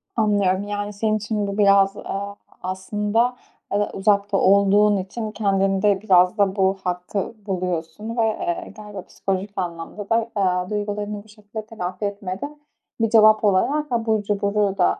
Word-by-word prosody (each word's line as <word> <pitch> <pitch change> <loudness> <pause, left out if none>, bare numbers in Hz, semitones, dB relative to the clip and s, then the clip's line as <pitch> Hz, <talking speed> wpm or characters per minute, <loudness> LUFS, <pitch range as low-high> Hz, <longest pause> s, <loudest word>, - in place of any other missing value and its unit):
Anlıyorum. 205 -3 +2
Yani, 205 0 -4
senin 215 +1 0
için 210 -1 -2
bu 200 0 -4
biraz, 195 -1 +4
aaa, 200 +1 -5 0.3
aslında, 210 +6 0 0.3
aaa, 205 +1 0
uzakta 200 0 +2
olduğun 200 +2 +4
için 215 +3 -4
kendinde 195 -1 +1
biraz 185 0 +4
da 195 -2 +2
bu 195 -1 +2
hakkı 180 +4 -3
buluyorsun 180 +3 -3
ve, 230 - +3
eee, 215 -5 -2
galiba 210 -2 -8
psikolojik 195 +2 -3
anlamda 175 +3 -5
da, 230 0 +1
aaa, 180 -2 +1
duygularını 205 0 -3
bu - - -22
şekilde 210 0 -9
telafi 185 -3 -5
etmede 200 +8 -5 0.4
bir 225 - +2
cevap 215 -1 +6
olarak, 270 +10 +2
abur 225 -3 +1
cuburu 200 -1 0
da 85 0 +2
205 Hz, 145 wpm, -22 LUFS, 190-215 Hz, 0.4 s, cevap